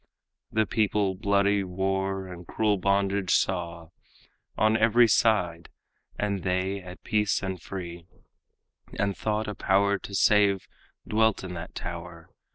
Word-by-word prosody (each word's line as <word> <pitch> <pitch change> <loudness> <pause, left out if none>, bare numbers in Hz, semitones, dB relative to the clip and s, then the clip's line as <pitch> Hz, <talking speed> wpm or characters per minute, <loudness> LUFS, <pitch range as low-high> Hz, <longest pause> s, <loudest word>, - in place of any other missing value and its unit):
The 110 0 +2
people 105 -3 +1
bloody 100 0 +2
war 95 +1 -2
and 90 -2 -10
cruel 105 -3 +1
bondage 100 0 +1
saw 85 -3 -1 0.7
On 110 +1 +3
every 115 +2 +5
side, 90 -7 +2 0.5
and 100 -2 -1
they 95 +2 -1
at 90 0 -11
peace 105 -1 +1
and 95 -3 -4
free, 85 -2 -7 0.9
And 100 -1 0
thought 110 0 -2
a 105 - -3
power 100 +1 +2
to 100 - -7
save 100 -2 +3 0.4
dwelt 110 -1 +2
in 90 -1 -6
that 85 0 -8
tower. 85 -1 -7
95 Hz, 130 wpm, -27 LUFS, 90-105 Hz, 0.9 s, every